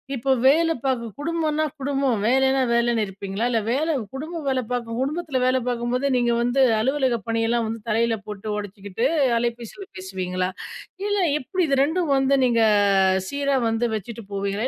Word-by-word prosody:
இப்ப 265 +2 -1
வேல 325 +5 +5
பார்க்க 255 -3 0
குடும்பம்ன்னா 310 0 0 0.2
குடும்பம். 275 -3 0
வேலைன்னா 265 +3 +3
வேலைன்னு 235 -1 +2
இருப்பீங்களா? 195 +2 -4
இல்ல 230 - +1
வேலை 305 +7 +1 0.2
குடும்பம் 315 +3 -5
வேலை 260 -1 +1
பார்க்கும் 235 -1 -3
குடும்பத்தில 295 0 -2
வேலை 255 0 +3
பார்க்கும்போது 245 +3 -1
நீங்க 240 -1 +2
வந்து 245 +3 +1 0.2
அலுவலக 260 +1 +1
பணியெல்லாம் 230 +1 +1
வந்து 225 0 -5
தலையில 225 +1 +1
போட்டு 210 0 -5
உடைச்சிக்கிட்டு 205 +3 -3 0.3
அலைபேசியில 235 - -4
பேசுவீங்களா? 185 -1 -3 0.6
இல்ல 410 0 0 0.2
எப்பிடி? 365 +8 -2
இது 275 -1 +1
2ம் 320 +1 0
வந்து 270 +1 +3
நீங்க 230 -2 +3 0.7
சீரா 280 -1 0
வந்து 225 +2 0
வச்சுட்டு 220 +1 -7
போவீங்களா? 200 +4 -1
245 Hz, 145 wpm, -23 LUFS, 225-275 Hz, 0.7 s, வேல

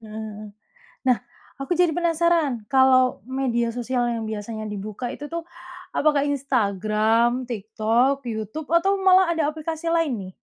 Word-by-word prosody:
Heeh 215 - -12
heeh. 215 -1 -7 0.6
Nah, 250 - +5 0.5
aku 275 - -3
jadi 345 -3 +3
penasaran 330 -8 +1
kalau 260 -3 +4 0.2
media 235 -3 0
sosial 245 +1 -2
yang 225 -2 -3
biasanya 215 0 -5
dibuka 210 +3 -5
itu 290 - -9
tuh, 335 0 -3 0.5
apakah 290 -1 +2
Instagram, 230 -2 +1
TikTok, 235 +4 0
YouTube 220 +6 -5
atau 390 +4 +3
malah 370 -1 +6
ada 325 -3 +1
aplikasi 315 +1 -5
lain 330 -4 +1
nih? 185 - -11
250 Hz, 140 wpm, -23 LUFS, 220-310 Hz, 0.6 s, malah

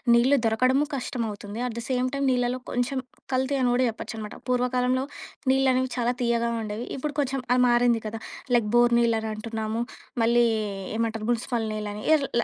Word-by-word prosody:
నీళ్ళు 260 +4 +5
దొరకడము 255 +6 +3
కష్టమవుతుంది. 225 -5 -4
At 235 - -5
the - - -6
same 255 0 +1
time 275 -1 0
నీళ్లలో 250 0 0
కొంచెం 245 +2 0 0.3
కల్తీ 260 +2 +1
అని 250 - +3
గూడా 250 +1 +3
చెప్పొచ్చనమాట. 220 -1 -6
పూర్వకాలంలో 250 +1 +1 0.5
నీళ్ళనేవి 260 -1 +2
చాలా 240 +1 +1
తియ్యగా 235 -1 +1
ఉండేవి. 215 +3 -4
ఇప్పుడు 290 +2 -4
కొంచెం 270 -1 -1
ఆ - - +2
మారింది 240 -1 +3
కదా! 220 +1 -6 0.3
లైక్ 225 -3 +2
బోర్ 240 0 +5
నీళ్ళని 225 -2 +1
అంటున్నాము. 220 0 -3 0.4
మళ్ళీ 235 +1 +4 0.5
ఏమంటరు 225 -1 -1
మునిసిపల్ 235 -1 -1
నీళ్ళని, 210 0 -4
యిర్ 290 -3 +4
ల - - -2
240 Hz, 160 wpm, -26 LUFS, 225-255 Hz, 0.5 s, నీళ్ళు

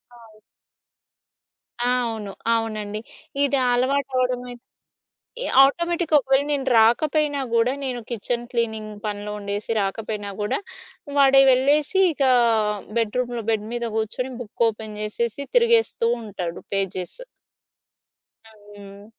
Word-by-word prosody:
అవును. 225 -2 -18 1.4
ఆ! 245 - +2 0.2
అవును. 215 -3 -5 0.2
అవునండి. 215 -2 -3 0.4
ఇది 280 0 +2
అలవాటు 260 +3 +1
అవ్వడమై 250 -1 -1 0.9
ఈ - - -2 0.2
ఆటోమేటిక్‌గా 340 +2 +2
ఒకవేళ 270 +1 +2
నేను 280 -2 -1
రాకపోయినా 285 +6 +3
కూడా, 230 +2 +3
నేను 255 -3 -3
కిచెన్ 240 +1 -2
క్లీనింగ్ 220 -3 -2
పనిలో 210 0 -4
ఉండేసి 205 +1 -5
రాకపోయినా 205 +1 -3
గూడా, 210 - 0 0.6
వాాడే 270 -1 +6
వెళ్ళేసి 285 +7 +2
ఇకా 270 -3 +2 0.7
బెడ్రూమ్‌లో, 240 +1 -1
బెడ్ 215 -1 -1
మీద 235 - -2
కూర్చొని 225 +4 -2
బుక్ 235 0 -2
ఓపెన్ 215 -1 -6
జేసేసి 230 +5 -3
తిరిగేస్తూ 465 - +3 0.2
ఉంటాడు. 180 -5 -5
పేజెస్. 195 - -3 1.3
హ్మ్. 205 -1 -14
235 Hz, 105 wpm, -23 LUFS, 210-270 Hz, 1.4 s, వాాడే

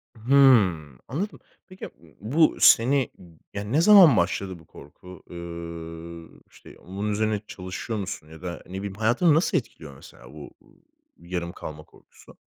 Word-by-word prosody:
Hımm, 110 - +3
anladım. 185 - -5 0.3
Peki, 185 0 -14
ya, - - -5
b 80 -2 -22
bu 145 - +2
seni, 130 +2 +4 0.4
yani 105 +1 -6
ne 150 +5 +3
zaman 180 - +7
başladı 95 0 -2
bu 80 - -19
korku? 90 +6 -15
Iıı, 85 -1 -9 0.2
işte, - - -16
onun 100 +4 -5
üzerine 105 0 -1
çalışıyor 95 +4 -6
musun 95 -5 -6
ya 80 0 -14
da, 90 -1 -7
ne 90 - -13
bileyim, 100 0 -5
hayatını 120 - +2
nasıl 160 - +1
etkiliyor 70 -3 -7
mesela 60 -1 -16
bu, 75 -2 -11
ııı, - - -25 0.5
yarım 85 0 -5
kalma 75 -3 -9
korkusu? - - -21
95 Hz, 155 wpm, -24 LUFS, 85-120 Hz, 0.5 s, zaman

